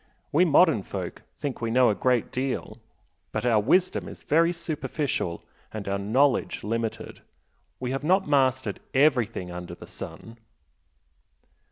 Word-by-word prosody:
We 170 +5 +4
modern 160 - +5
folk - - -6 0.2
think 140 -4 -4
we 115 - -1
know 125 0 +4
a - - +1
great 125 +4 +1
deal 130 +1 -3 0.5
but - - -2
our 115 -3 +4
wisdom 180 - +2
is - - -10
very 165 +3 +3
superficial 150 - -3 0.3
and 105 -2 -6
our 100 0 -1
knowledge 125 +7 +1
limited. 115 +1 -3 0.6
We 125 0 -3
have 135 +2 -3
not 185 +3 +3
mastered 130 -6 +2 0.2
EVERYTHING 125 -10 +2
under 90 0 -7
the - - -11
sun!" 115 +1 -9
130 Hz, 140 wpm, -26 LUFS, 110-145 Hz, 0.6 s, modern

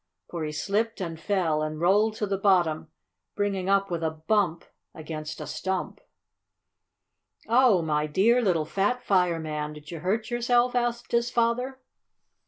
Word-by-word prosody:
For 170 -2 -4
he 155 - -3
slipped 210 +8 -1
and 165 -4 -5
fell, 165 -4 0
and 155 0 -3
rolled 205 +5 +3
to 215 - -2
the 195 -1 -2
bottom, 175 -6 +2 0.5
bringing 195 -2 -1
up 195 -1 +2
with 170 -1 -2
a 160 - +1
bump 165 +2 0 0.3
against 155 -1 -6
a - - -5
stump. 190 0 -4 1.5
"Oh, 230 -6 +4
my 150 -1 0
dear 220 +11 +3
little 175 -8 +1
fat 205 +9 -1
fireman! 160 -5 0
Did 150 +1 -12
you 165 - -6
hurt 215 +8 -1
yourself?" 240 +1 +2
asked 240 -1 -1
his 235 0 +2
father. 245 +3 0
190 Hz, 150 wpm, -26 LUFS, 160-225 Hz, 1.5 s, Oh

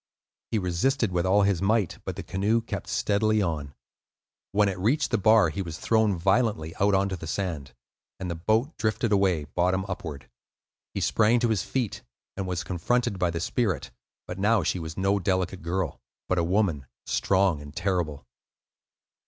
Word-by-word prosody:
He 115 - 0
resisted 105 +5 +1
with 90 0 0
all 100 +2 +4
his 100 -3 +1
might, 100 -2 +1
but - - -4
the - - -6
canoe 105 +5 +1
kept 115 - -5
steadily 110 +1 +1
on. 75 -7 -2 0.8
When 105 +1 +3
it 95 -2 -2
reached 125 +11 +1
the 115 - +2
bar, 110 -3 +5
he 80 +6 -4
was 85 -4 -5
thrown 110 -3 +2
violently 95 -3 +1
out 100 0 +4
on 95 +1 +2
to 95 - -2
the 80 -2 -8
sand, 80 -8 -3 0.4
and 95 - -4
the 85 - -2
boat 110 - 0
drifted 110 0 0
away 95 -6 +2
bottom 90 +6 0
upward. 80 -8 -6 0.7
He - - -1
sprang 115 +2 +3
to 120 - +2
his 110 -4 +1
feet, 125 -6 -2 0.3
and 95 -1 -3
was 90 -1 -2
confronted 95 +4 0
by 90 -1 +2
the 85 0 -3
spirit; 95 - -1 0.3
but 90 - -7
now 105 0 +3
she 90 - 0
was 80 -1 -7
no 95 +1 +2
delicate 95 0 -1
girl, 85 -1 -2 0.3
but 95 - +1
a - - +2
woman, 85 -7 0 0.2
strong 95 -5 +2
and 75 0 -11
terrible. 85 -7 -1
95 Hz, 175 wpm, -26 LUFS, 85-105 Hz, 0.8 s, bar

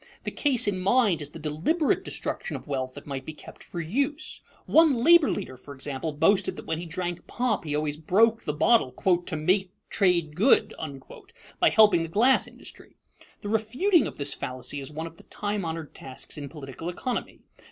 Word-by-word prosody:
The - - -3
case 265 -7 +1
in 195 -2 0
mind 200 -4 +3
is 145 - -5
the 165 - -10
deliberate 160 - 0
destruction - - -4
of - - -7
wealth 130 -2 -3
that - - -10
might 135 -2 -5
be 155 +3 -8
kept - - -13
for 175 - -7
use. 280 - -2 0.2
One 300 -8 +4
labor 340 0 +7
leader, 130 -11 -4
for 140 +3 -11
example, 135 +3 -4
boasted 165 +7 +2
that - - -9
when 160 - -2
he 175 - -6
drank 175 +1 -4
pop 240 -7 -1
he 150 -1 -2
always 150 0 -1
broke 220 +8 +3
the - - -1
bottle 155 - +3
"to 175 +1 0
make 185 +5 +1 0.2
trade 175 -6 +2
good" 215 - +4 0.9
by - - +5
helping 210 -6 +5
the 165 - -2
glass 240 +9 +3
industry. - - -11 0.5
The 205 - -5
refuting 255 - +2
of - - -9
this 145 0 -2
fallacy 130 +3 -5
is 135 0 -6
one 160 +2 -5
of 165 0 -10
the - - -15
time 205 -1 -3
honored 160 -2 -5
tasks 130 -1 -5
in 145 -2 -5
political 145 +2 -7
economy. 245 +8 -4
175 Hz, 190 wpm, -26 LUFS, 150-220 Hz, 0.9 s, labor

